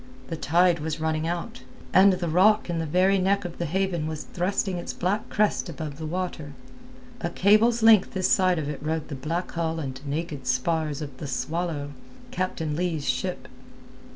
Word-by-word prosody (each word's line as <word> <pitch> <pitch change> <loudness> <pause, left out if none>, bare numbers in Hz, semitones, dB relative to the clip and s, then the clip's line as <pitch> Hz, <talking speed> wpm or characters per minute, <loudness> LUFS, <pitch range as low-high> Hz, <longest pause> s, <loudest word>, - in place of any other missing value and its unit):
The 165 - -2
tide 175 +2 +3
was 155 +1 -3
running 160 0 -1
out, 175 +8 -4 0.3
and 190 +1 +7
the 180 -1 -2
rock 190 +4 +4
in 170 - -1
the 165 - -2
very 185 +5 +3
neck 195 +1 +1
of 175 - -7
the 170 - -1
haven 180 -2 -1
was 155 -1 -4
thrusting 185 0 -1
its - - -5
black 200 +5 -1
crest 210 -3 +1
above 150 -1 -6
the 160 - -4
water. 165 -4 -4 0.7
A 170 - -2
cable's 215 +6 +3
length 220 -4 +6
this 185 -1 +1
side 185 -2 +3
of 155 -2 -2
it 150 -2 -5
rode 155 0 -2
the 145 - -4
black 165 +7 -3
hull 165 -1 -2
and 135 -3 -5
naked 145 -2 -4
spars 155 0 0
of 140 -3 -8
the 145 - -6
Swallow—Captain 165 - -4
Leigh's 165 -4 -2
ship. 130 +9 -2
170 Hz, 180 wpm, -26 LUFS, 155-185 Hz, 0.7 s, and